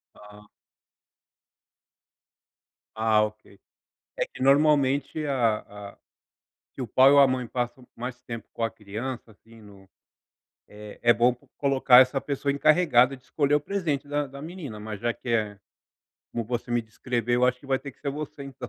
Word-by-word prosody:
Ah. 105 0 -16 2.5
Ah, 110 -1 +3
ok, 105 -2 -7 0.6
é - - 0
que - - -13
normalmente 140 +1 +3
a 120 -6 +1 0.3
a - - -27 0.8
que 135 - -6
o 120 - -4
pai 130 +5 +6
ou 145 - +6
a 140 - +7
mãe 130 -1 -1
passam 125 +1 -4
mais 120 +1 -6
tempo 115 -3 -8
com 115 - -4
a 115 - +1
criança, 110 +3 -7
assim, 115 +2 -19
no 100 -2 -17 0.8
é 105 0 -11
é 120 0 +6
bom 120 +1 +3
po 125 - -27
colocar 135 -2 +5
essa 130 +1 +2
pessoa 140 0 -2
encarregada 140 -4 +4
de 125 - -23
escolher 145 -1 0
o - - 0
presente 150 -5 -2
da 145 0 -1
da 140 +1 -11
menina, 155 - -8
mas 105 -2 -7
já 120 +1 0
que - - -12
é 105 -4 0 0.7
como 115 - -3
você 120 +1 -4
me 120 0 +1
descreveu. 120 +2 -2
Eu - - +7
acho 125 0 0
que - - -15
vai 135 -1 +1
ter 140 +1 -9
que - - -33
ser 140 - -2
você, 145 0 -7
então. 130 -2 -8
125 Hz, 175 wpm, -26 LUFS, 115-140 Hz, 2.5 s, a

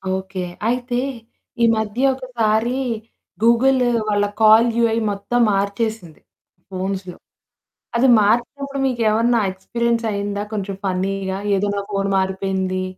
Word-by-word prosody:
Okay. 190 0 -5 0.3
అయితే, 245 0 -1 0.6
ఈ - - +7
మధ్య 220 +3 -2
ఒకసారి 240 -2 0 0.7
గూగుల్ 255 +3 +4 0.3
వాళ్ళ 205 0 +2 0.2
కాల్ 220 +2 +7
యూఐ 230 -1 +2
మొత్తం 200 +5 -2
మార్చేసింది 200 -3 -2 0.5
ఫోన్స్‌లో. 185 -1 -4 0.8
అది 260 +3 +4
మార్చినప్పుడు 270 +6 0
మీకేమన్నా 235 -1 +2
ఎక్స్‌పీరియన్స్ 235 +4 -2
అయిందా 200 0 -3
కొంచెం 200 -2 -3
ఫన్నీ‌గా? 190 +1 -2 0.2
ఏదో 205 +2 0
నా - - -1
ఫోన్ 195 0 -1
మారిపోయింది? 190 -1 -1
215 Hz, 105 wpm, -20 LUFS, 195-235 Hz, 0.8 s, ఈ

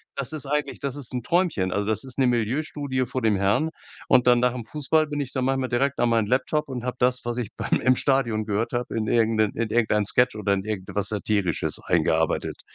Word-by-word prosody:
das 140 0 -3
ist 150 -3 -3
eigentlich 150 +1 -2
das 140 -2 -3
ist 140 -4 -5
'n 125 - -2
Träumchen. 160 - 0
Also, 100 +2 -1
das 110 +3 0
ist 130 -2 -3
'ne 135 - +3
Milieustudie 130 +3 -1
vor 130 +2 -4
dem 110 -3 +2
Herrn 100 +11 +1 0.4
und 125 - +4
dann 120 -1 +5
nach 125 0 +2
dem 120 -3 -6
Fußball 155 +4 0
bin 145 -1 -3
ich 135 - -5
dann 130 -1 -1
manchmal 135 -1 0
direkt 135 +4 0
an 120 - +2
meinen 115 -2 +2
Laptop 135 +5 0
und 125 -3 -6
habe 125 0 -3
das, 125 0 +1
was 120 0 -3
ich 120 -5 -3
beim - - 0
im 130 0 +3
Stadion 120 -6 +1
gehört 105 +3 -2
habe, 120 -1 -3
in 110 - -1
irgend 115 0 +2
'nen 110 -2 +2
in 115 -1 -2
irgendein 110 -2 +2
Sketch 125 +3 +3
oder 105 -2 0
in 95 -1 -1
irgendwas 105 -1 0
Satirisches 100 -4 0
eingearbeitet. - - 0
125 Hz, 230 wpm, -24 LUFS, 110-135 Hz, 0.4 s, dann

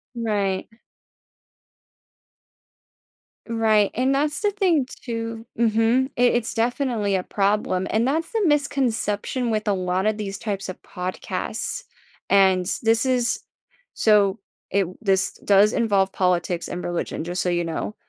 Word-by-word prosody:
Right. 205 -5 -1 2.8
Right, 220 -3 +3
and 260 +3 +2
that's 295 +4 0
the 415 -1 +2
thing 360 -9 +2 0.2
too 230 -1 -4
Mhm. 230 +3 +3
I - - 0
it's 240 -2 +2
definitely 230 -3 0
a 185 - 0
problem 195 -2 0
and 225 +4 +1
that's 320 - -1
the 445 -3 0
misconception 260 -5 0
with 215 -1 -1
a 205 - +3
lot 185 +1 -1
of 215 0 +1
these 195 -2 -4
types 195 -3 -4
of 185 - -8
podcasts. 185 - -4 0.5
And 190 -2 +4 0.2
this 225 +2 +3
is 250 -2 0 0.5
so, 205 -2 +3 0.3
it 195 -1 +2 0.2
this 195 -1 +1
does 205 +2 +5
involve 200 -5 +2
politics 175 -2 0
and 180 0 -5
religion, 175 -2 -3
just 175 +2 -3
so 180 - 0
you 175 0 0
know. 165 +6 -4
215 Hz, 135 wpm, -23 LUFS, 195-245 Hz, 2.8 s, does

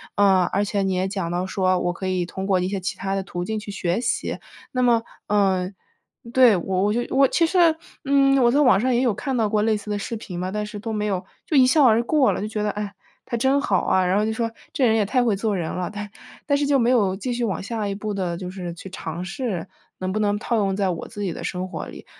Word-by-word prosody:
呃， 195 -2 +4
而 200 - +2
且 200 -1 -1
你 190 - 0
也 185 +1 0
讲 190 -3 -3
到 175 +1 -1
说 185 -1 +1
我 175 0 -1
可 190 +2 -5
以 185 -1 0
通 190 +2 -5
过 190 -2 +2
一 180 - -1
些 195 0 -2
其 185 - -3
它 195 0 -2
的 195 - -1
途 175 -2 -5
径 220 +2 -2
去 205 -1 -7
学 185 +1 -1
习， 245 - -1 0.3
那 255 - 0
么 235 -2 +4 0.3
呃， 190 -2 +2 0.6
对， 250 -5 +6
我 185 +2 -1
我 210 - +2
就 240 - +1
我 275 0 +6
其 335 - +2
实， 340 -3 +4 0.3
嗯， 275 0 +4
我 240 - +5
在 285 - +3
网 245 -8 +5
上 255 +3 +1
也 240 - +2
有 245 -4 +2
看 265 +4 -3
到 220 -2 +1
过 210 -1 +1
类 220 0 +2
似 210 0 -10
的 205 - 0
视 230 - -4
频 185 -5 -8
嘛， 185 +1 -3
但 210 +1 -2
是 210 0 -7
都 220 +2 -4
没 210 -1 -1
有 190 -2 -2 0.2
就 305 - +2
一 260 - +7
笑 290 +3 +5
而 230 0 +5
过 285 +2 +3
了， - - -3
就 210 - -2
觉 215 -1 -3
得 210 - 0
哎， 205 -1 -5 0.3
他 235 - -3
真 265 +4 +3
好 195 -10 +2
啊， 185 -1 +3
然 180 +1 +2
后 210 - +1
就 220 - 0
说： 230 0 -1 0.2
“这 260 - +2
人 220 - +4
也 220 - +3
太 245 +5 +2
会 220 -4 +2
做 210 +1 -1
人 165 -3 -3
了，” 180 -1 -3
但 205 0 -6 0.4
但 285 - +2
是 285 0 0
就 280 -1 +4
没 235 0 +3
有 200 -7 +3
继 240 +6 -3
续 240 - -2
往 195 -7 -1
下 215 0 -3
一 195 - -2
步 210 +1 -4
的 180 -4 -2
就 180 0 -6
是 180 -3 -6
去 185 +3 -10
尝 175 -1 -5
试， 195 -2 -3 0.3
能 185 0 -2
不 215 - -1
能 205 -1 +1
套 235 - -1
用 195 -2 +1
在 195 -1 +1
我 170 -2 -4
自 205 - -6
己 180 -4 -2
的 - - -7
生 185 0 -3
活 - - -5
里。 - - -11
205 Hz, 300 characters per minute, -23 LUFS, 185-235 Hz, 0.6 s, 一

